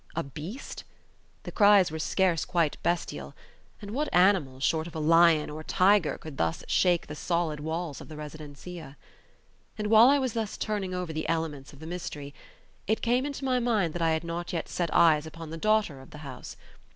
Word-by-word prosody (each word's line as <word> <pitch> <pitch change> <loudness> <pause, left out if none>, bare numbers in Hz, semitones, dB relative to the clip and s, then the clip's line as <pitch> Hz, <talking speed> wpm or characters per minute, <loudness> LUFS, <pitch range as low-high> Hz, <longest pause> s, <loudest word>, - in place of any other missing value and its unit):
A 165 - -1
beast? 160 - -8 0.6
The - - -7
cries 205 -5 +5
were 160 - -5
scarce 175 0 +1
quite 170 -4 0
bestial; 75 - -2 0.4
and 205 -1 -8
what 295 +6 -2
animal, 180 -8 +3
short 160 +4 0
of 170 - -11
a - - -3
lion 165 0 +5
or 150 - -6
a - - -8
tiger, 190 -1 +3
could 155 -4 -10
thus 80 0 -1
shake 175 -2 +2
the 150 - -8
solid 165 -1 -1
walls 160 -1 -4
of - - -11
the 155 - -10
residencia? 150 0 -9 0.8
And 210 0 -2
while 225 +3 +8
I 285 - +5
was 260 -4 -1
thus 225 -3 -3
turning 200 -4 -2
over 180 -3 -4
the 155 0 -3
elements 160 -4 -2
of 140 - -15
the 160 - -11
mystery, 155 -4 -6 0.5
it 220 +2 0
came 250 +3 +2
into 280 -1 -5
my 255 -1 +2
mind 215 -9 +1
that 175 - -4
I 165 - +3
had 160 +1 -1
not 170 +2 -5
yet 165 - -2
set 175 -2 -2
eyes 160 -2 +4
upon 160 0 -9
the 165 - -5
daughter 210 -7 +1
of 130 - -15
the - - -11
house. - - -9
170 Hz, 200 wpm, -28 LUFS, 155-200 Hz, 0.8 s, while